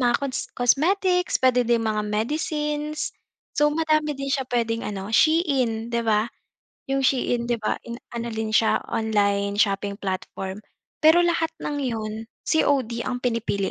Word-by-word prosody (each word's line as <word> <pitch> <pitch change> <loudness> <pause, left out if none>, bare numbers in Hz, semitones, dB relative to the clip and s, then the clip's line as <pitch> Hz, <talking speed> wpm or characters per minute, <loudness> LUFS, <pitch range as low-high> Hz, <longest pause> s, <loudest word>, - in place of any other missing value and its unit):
mga 240 -1 +3
cons 275 -2 -3
cosmetics, 360 +8 +2
puwede 250 -2 +3
din 235 -1 +2
mga 215 -1 0
medicines. 300 +6 -2 0.4
So 295 - +3
madami 310 -1 +1
din 275 0 -4
siya 265 -2 -1
puwedeng 230 -1 0
ano, 200 +1 -5
SHEIN, 255 -7 +2
'di 235 - +1
ba? 215 -1 +2 0.6
'Yong 270 0 0
SHEIN, 245 -2 +1
'di 240 0 +1
ba, 215 - 0
in 235 0 -7 0.2
ano 235 0 -3
din 220 0 -2
siya 220 +1 +3
online 200 -2 +1
shopping 200 -1 +1
platform. 190 0 -4 0.5
Pero 320 +3 +7
lahat 335 -2 +1
ng 290 - -3
'yon, 225 -4 -2 0.3
COD 260 -7 +1
ang 245 -1 -2
pinipili 230 -5 -1
240 Hz, 150 wpm, -24 LUFS, 220-295 Hz, 0.6 s, Pero